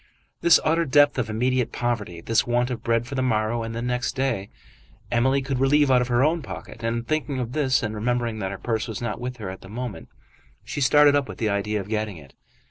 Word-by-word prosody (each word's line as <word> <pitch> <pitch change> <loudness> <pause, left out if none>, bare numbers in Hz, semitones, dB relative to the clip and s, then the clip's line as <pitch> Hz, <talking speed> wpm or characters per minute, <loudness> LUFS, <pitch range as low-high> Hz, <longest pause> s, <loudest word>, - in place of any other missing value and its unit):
This 170 0 +6
utter 165 +2 +3
depth 145 -1 +4
of 110 -3 -1
immediate 125 +2 0
poverty, 110 -8 -3
this 115 +6 +1
want 120 +1 +1
of 125 - -4
bread 115 0 +1
for 135 - -8
the 130 - 0
morrow 115 -2 0
and 115 0 -5
the 115 - -3
next 125 +1 -1
day, 130 -7 -1 0.6
Emily 130 +3 +2
could 135 -1 -2
relieve 140 +1 +4
out 125 -1 +5
of 125 - -1
her 120 +1 +2
own 160 +3 +2
pocket. 120 -4 -9
And, 115 +1 -2
thinking 155 -3 -1
of 125 -2 -3
this 135 -2 +1
and 110 -1 -2
remembering 120 0 -1
that 95 -2 -2
her 100 - -5
purse 110 +2 -2
was 110 -3 -5
not 120 0 -4
with 125 0 -4
her 105 -5 -5
at 95 - -10
the 95 - -12
moment, 120 0 -6 0.5
she 145 - -5
started 145 +2 +6
up 140 -2 0
with - - -7
the 110 - 0
idea 105 +1 -1
of 95 - -6
getting 105 -3 -2
it. 70 -4 -15
120 Hz, 235 wpm, -24 LUFS, 110-130 Hz, 0.6 s, This